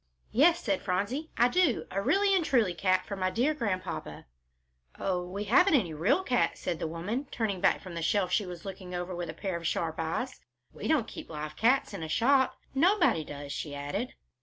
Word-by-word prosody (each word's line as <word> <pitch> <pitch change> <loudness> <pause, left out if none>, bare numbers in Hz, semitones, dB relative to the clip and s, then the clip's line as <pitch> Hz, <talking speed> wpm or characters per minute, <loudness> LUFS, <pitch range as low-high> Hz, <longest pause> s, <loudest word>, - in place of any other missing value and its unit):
"Yes," 330 +8 +5
said 195 -4 0
Phronsie, 205 +12 -2
"I 240 - +5
do, 315 -3 +2
a 195 - -1
really 395 - +3
and 365 - +2
truly 235 - +2
cat 185 +1 +1
for 200 - -5
my 185 -1 0
dear 250 +10 +1
Grandpapa." 185 - -4 0.7
"Oh, 180 -2 -1
we 190 +3 -5
haven't 360 - +5
any 185 - +1
real 175 - +2
cats," 245 -8 +1
said 170 - -3
the - - -2
woman, 200 - -3
turning 205 -6 -2
back - - +3
from 185 - -8
the 170 - -4
shelf 185 +2 +1
she 200 +1 +1
was 175 0 -8
looking 185 -2 -7
over 175 +1 -3
with 175 -1 -4
a - - -4
pair 190 0 -3
of 170 -1 -3
sharp 165 -1 -2
eyes. 165 +11 -2 0.3
"We - - -5
don't 290 -8 +2
keep - - -9
live 150 -1 -6
cats 235 - +2
in 195 - -5
a 160 - -5
shop. 260 - +3 0.2
Nobody 340 - +3
does," 145 -1 -8
she 145 0 -4
added. 165 - -4
195 Hz, 210 wpm, -29 LUFS, 170-255 Hz, 0.7 s, Yes